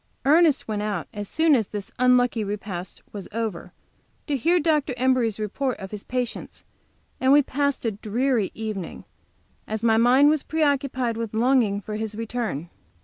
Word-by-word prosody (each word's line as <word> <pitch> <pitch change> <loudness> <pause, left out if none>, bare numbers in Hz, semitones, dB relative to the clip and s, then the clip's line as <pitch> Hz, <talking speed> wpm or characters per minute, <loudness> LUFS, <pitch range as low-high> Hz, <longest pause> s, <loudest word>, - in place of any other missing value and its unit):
Ernest 310 0 +4
went 210 -2 -2
out 205 -5 -3
as 205 -2 -6
soon 320 -1 +3
as 225 -7 +2
this 205 -2 -7
unlucky 250 -2 +3
repast 200 -3 -6
was 200 -2 -7
over 215 -6 -4 0.5
to 290 - -1
hear 335 +8 +2
Dr. 300 -5 +1
Embury's 245 -4 +1
report 245 +5 -2
of 190 -1 -8
his 210 -2 -7
patients, 250 -1 -4 0.5
and 260 +1 +3
we 290 +1 +7
passed 280 0 -1
a 225 - +1
dreary 220 +1 0
evening, 215 -5 -5 0.6
as 220 +1 -4
my 225 -1 +4
mind 255 +5 +5
was 310 -2 +1
preoccupied 275 -6 0
with 230 -2 -4
longing 230 -4 +2
for 210 +2 -5
his 215 -1 -4
return. 220 - -4
230 Hz, 160 wpm, -24 LUFS, 210-270 Hz, 0.6 s, we